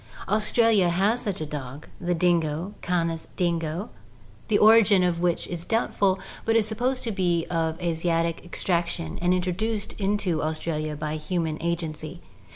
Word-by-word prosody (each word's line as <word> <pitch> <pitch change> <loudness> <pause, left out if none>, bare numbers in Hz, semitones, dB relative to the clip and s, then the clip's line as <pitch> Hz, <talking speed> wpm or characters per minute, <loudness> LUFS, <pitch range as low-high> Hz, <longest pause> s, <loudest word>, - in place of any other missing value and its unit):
Aus 215 +2 +1
tralia 225 -6 +4
has 200 +8 +2
such 200 -6 -2
a - - -1
dog, 145 -1 -7
the 175 0 0
dingo 170 +1 +1
(Canis 165 -2 -1
dingo), 170 +2 -1 0.6
the 215 - +3
origin 210 -3 +6
of 175 -2 +1
which 175 -1 0
is 175 -2 -5
doubtful, 200 -3 +1 0.2
but 225 - +1
it - - +7
is 215 -2 +2
supposed 245 +4 -1
to 230 - -2
be 175 -4 +1
of 165 -1 -1
Asiatic 165 -1 0
extraction 170 -1 -2
and 175 +1 +2
intro 180 0 +1
duced 215 +2 -2
into 195 -5 0
Australia 155 -1 -2
by 150 +1 -3
human 160 0 -2
agency. 165 -1 -3
175 Hz, 160 wpm, -25 LUFS, 165-200 Hz, 0.6 s, it